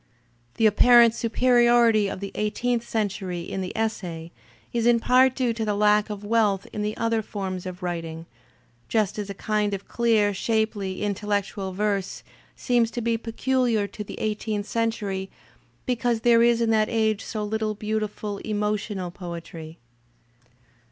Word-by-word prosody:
The 225 Hz, -, +2 dB
apparent 235 Hz, +2 st, +6 dB
superiority 235 Hz, -2 st, +3 dB
of 190 Hz, -, -6 dB
the 200 Hz, -, -5 dB
eighteenth 230 Hz, +3 st, -1 dB
century 195 Hz, -5 st, -2 dB
in 190 Hz, +3 st, -5 dB
the 185 Hz, -, -4 dB
essay 175 Hz, -7 st, -3 dB, 0.4 s
is 235 Hz, -1 st, +1 dB
in 240 Hz, -1 st, +5 dB
part 255 Hz, +2 st, +4 dB
due 245 Hz, -3 st, 0 dB
to 225 Hz, 0 st, -3 dB
the 210 Hz, -1 st, 0 dB
lack 210 Hz, +1 st, +3 dB
of 210 Hz, -1 st, -6 dB
wealth 205 Hz, -3 st, +1 dB
in 210 Hz, -, -3 dB
the 210 Hz, +1 st, -2 dB
other 230 Hz, -1 st, 0 dB
forms 190 Hz, -3 st, -5 dB
of 180 Hz, 0 st, -8 dB
writing, 165 Hz, -2 st, -4 dB, 0.6 s
just 215 Hz, -2 st, 0 dB
as 205 Hz, -1 st, -4 dB
a 200 Hz, -, -5 dB
kind 210 Hz, 0 st, 0 dB
of 195 Hz, -, -10 dB
clear, 220 Hz, -3 st, +2 dB
shapely, 205 Hz, -2 st, -1 dB
intellectual 205 Hz, -1 st, -2 dB
verse 200 Hz, 0 st, -2 dB, 0.3 s
seems 240 Hz, -3 st, +1 dB
to 240 Hz, -, -4 dB
be 230 Hz, 0 st, +1 dB
peculiar 235 Hz, -1 st, 0 dB
to 210 Hz, -, -7 dB
the -, -, -9 dB
eigh 215 Hz, -1 st, 0 dB
teenth 210 Hz, -1 st, -4 dB
century 210 Hz, -4 st, -2 dB, 0.6 s
because 240 Hz, -2 st, 0 dB
there 235 Hz, -1 st, +5 dB
is 235 Hz, 0 st, +4 dB
in 230 Hz, -1 st, +2 dB
that 215 Hz, -1 st, +2 dB
age 220 Hz, -2 st, +1 dB
so 215 Hz, -2 st, -4 dB
little 215 Hz, 0 st, -2 dB
beautiful 210 Hz, -1 st, -3 dB
emotional 210 Hz, -3 st, -2 dB
poetry. 170 Hz, -2 st, -8 dB
215 Hz, 155 wpm, -25 LUFS, 200-230 Hz, 0.6 s, apparent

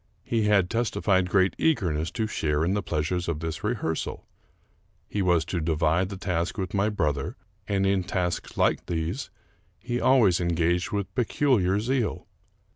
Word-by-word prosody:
He 115 Hz, -2 st, 0 dB
had 100 Hz, -4 st, +4 dB
testified 100 Hz, -4 st, +1 dB
great 95 Hz, 0 st, +3 dB
eagerness 85 Hz, -, +1 dB
to 115 Hz, -2 st, -1 dB
share 75 Hz, -7 st, 0 dB
in 90 Hz, -, +1 dB
the 105 Hz, -, 0 dB
pleasures 85 Hz, +1 st, -2 dB
of 85 Hz, -3 st, -2 dB
this 80 Hz, -1 st, -5 dB
rehearsal. 105 Hz, -8 st, -2 dB, 0.8 s
He 105 Hz, -, -2 dB
was 90 Hz, -4 st, +2 dB
to 90 Hz, -, -2 dB
divide 80 Hz, +3 st, +1 dB
the 100 Hz, -, -6 dB
task 90 Hz, 0 st, -2 dB
with 95 Hz, -3 st, -3 dB
my 100 Hz, +1 st, +2 dB
brother, 75 Hz, -9 st, -1 dB, 0.3 s
and 100 Hz, -1 st, +1 dB
in 95 Hz, -1 st, +2 dB
tasks 90 Hz, -1 st, -3 dB
like -, -, +1 dB
these 85 Hz, +8 st, -3 dB, 0.5 s
he 120 Hz, +1 st, -3 dB
always 115 Hz, -10 st, +4 dB
engaged 85 Hz, +3 st, +1 dB
with 100 Hz, -3 st, -3 dB
peculiar 115 Hz, -6 st, +2 dB
zeal. 120 Hz, +1 st, -1 dB
95 Hz, 155 wpm, -26 LUFS, 85-105 Hz, 0.8 s, had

